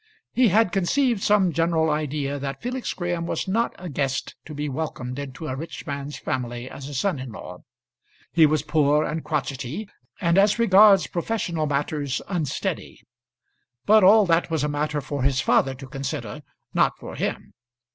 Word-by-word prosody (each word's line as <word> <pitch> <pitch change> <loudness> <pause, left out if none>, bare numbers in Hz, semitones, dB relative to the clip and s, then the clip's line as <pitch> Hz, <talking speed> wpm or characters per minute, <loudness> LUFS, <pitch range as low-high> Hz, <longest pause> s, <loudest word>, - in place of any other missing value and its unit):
He 250 -1 +4
had 215 0 +3
conceived 225 +5 +1
some 200 -5 +3
general 165 0 +2
idea 145 -1 -2
that 135 0 -4
Felix 250 +1 -3
Graham 175 -2 -3
was - - -2
not 230 +5 0
a 180 - -8
guest 135 -3 -2
to 155 - -8
be 150 +1 -3
welcomed 135 -3 -4
into 140 +2 -7
a 130 - -3
rich 160 +5 -7
man's 140 0 -5
family 125 -4 -4
as 140 +1 -8
a 145 - -7
son 180 +1 0
in 130 -2 -7
law. - - -9 0.7
He 160 -2 +6
was 150 -1 +1
poor 150 -1 +2
and 160 +1 -3
crotchety, 140 - -3 0.3
and 170 0 +3
as 200 +2 +4
regards 200 -3 +6
professional 170 -4 -2
matters 145 -1 -1
unsteady. 170 -8 -3 0.8
But 215 0 +6
all 210 +2 +7
that 170 -1 +2
was 160 -3 0
a - - +1
matter 150 0 -1
for 140 0 -4
his 135 0 +2
father 135 0 +2
to 135 +1 -10
consider, 135 -2 -5 0.3
not - - +2
for - - -9
him. - - -4
155 Hz, 170 wpm, -24 LUFS, 140-185 Hz, 0.8 s, all